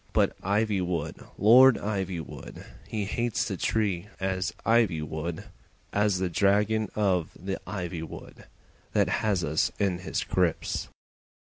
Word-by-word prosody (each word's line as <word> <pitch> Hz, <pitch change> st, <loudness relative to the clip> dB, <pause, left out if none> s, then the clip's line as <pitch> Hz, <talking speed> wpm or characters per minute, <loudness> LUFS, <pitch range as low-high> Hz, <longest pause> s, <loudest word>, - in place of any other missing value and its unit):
But -, -, +2 dB
Ivywood, 95 Hz, -6 st, -1 dB
Lord 125 Hz, +4 st, +8 dB
Ivywood, 95 Hz, -6 st, -5 dB, 0.2 s
He 105 Hz, -2 st, -2 dB
hates 115 Hz, +2 st, -1 dB
the -, -, -2 dB
tree 100 Hz, -4 st, 0 dB
as 95 Hz, 0 st, -1 dB
ivy 110 Hz, -9 st, +3 dB
would, 80 Hz, +2 st, -4 dB, 0.5 s
As 100 Hz, -2 st, +2 dB
the 95 Hz, 0 st, 0 dB
dragon 105 Hz, +4 st, +2 dB
of 95 Hz, -6 st, +1 dB
the 95 Hz, +1 st, -4 dB
ivy 90 Hz, -4 st, -4 dB
would 80 Hz, -, -10 dB, 0.5 s
That -, -, +3 dB
has 105 Hz, -6 st, +1 dB
us 80 Hz, 0 st, +1 dB
in 95 Hz, -3 st, 0 dB
his 90 Hz, -, -2 dB
grips. -, -, 0 dB
95 Hz, 125 wpm, -27 LUFS, 85-105 Hz, 0.5 s, Lord